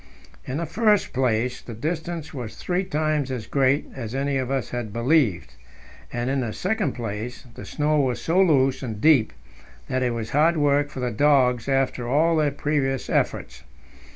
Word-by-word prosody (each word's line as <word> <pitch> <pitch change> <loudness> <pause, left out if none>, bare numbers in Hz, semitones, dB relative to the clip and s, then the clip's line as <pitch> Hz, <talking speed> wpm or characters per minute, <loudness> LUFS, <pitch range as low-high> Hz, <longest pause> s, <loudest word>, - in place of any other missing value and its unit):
In 130 - -3
the 170 - -2
first 210 +5 +2
place, 125 -1 0
the 115 - -9
distance 160 +5 -4
was 120 -6 -6
three 180 +1 -1
times 155 -5 -1
as 125 -4 -4
great 140 +1 +2
as 120 -2 -6
any 140 0 0
of 130 -1 -2
us 135 -4 -2
had 120 -3 -4
believed; 115 - +1 0.6
and, 120 0 -2
in 135 +1 0
the 115 -3 -3
second 185 -8 -1
place, 115 +2 -5
the - - -9
snow 150 0 0
was 130 -4 0
so 175 +4 +2
loose 135 -7 +3
and 115 -6 -5
deep 135 -5 +4 0.6
that 130 - 0
it 125 -2 0
was 110 -1 -5
hard 160 +4 +3
work 145 -1 +2
for 135 -3 -7
the 125 -1 -1
dogs 125 -1 +3
after 135 -2 0
all 160 +5 +3
their 150 -2 +3
previous 140 -2 -1
efforts. - - -1
135 Hz, 180 wpm, -24 LUFS, 120-150 Hz, 0.6 s, deep